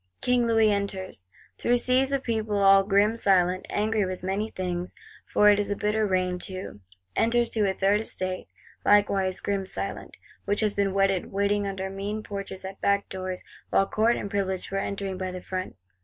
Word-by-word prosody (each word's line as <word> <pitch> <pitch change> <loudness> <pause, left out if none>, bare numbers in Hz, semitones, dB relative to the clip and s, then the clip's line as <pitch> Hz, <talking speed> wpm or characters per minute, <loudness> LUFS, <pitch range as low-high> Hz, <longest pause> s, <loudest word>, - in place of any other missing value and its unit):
King 245 -1 +2
Louis 225 -2 +4
enters, 190 - -3 0.3
through 245 +1 +3
seas 255 +2 +2
of 275 -1 0
people, 220 -3 -1
all 195 0 +6
grim 200 +2 +3
silent, 185 -4 +2
angry 215 0 +1
with 185 -1 -4
many 195 +4 -1
things,—for 180 +3 -1
it 205 - +3
is 205 - -1
a 205 - 0
bitter 210 +1 0
rain 185 -1 0
too. 185 - -7 0.4
Enters, 235 +1 +2
to 210 -3 +1
a - - 0
Third 200 +3 +2
Estate, 185 -4 -4 0.4
likewise 195 -2 +3
grim 200 -1 -1
silent; 190 - -5 0.3
which 205 +2 +1
has 210 -2 +1
been 195 -1 0
wetted 195 -2 +1
waiting 200 +1 +1
under 190 -1 -3
mean 205 +2 -4
porches, 200 -2 -6
at 190 +1 -8
back 200 0 +1
doors, 185 -1 -5 0.3
while 195 - +3
Court 220 +4 +2
and 200 - -5
Privileged 190 -2 -2
were 195 - 0
entering 195 -1 -3
by 185 -1 -3
the 185 - -6
front. 185 - -5
200 Hz, 180 wpm, -26 LUFS, 190-210 Hz, 0.4 s, all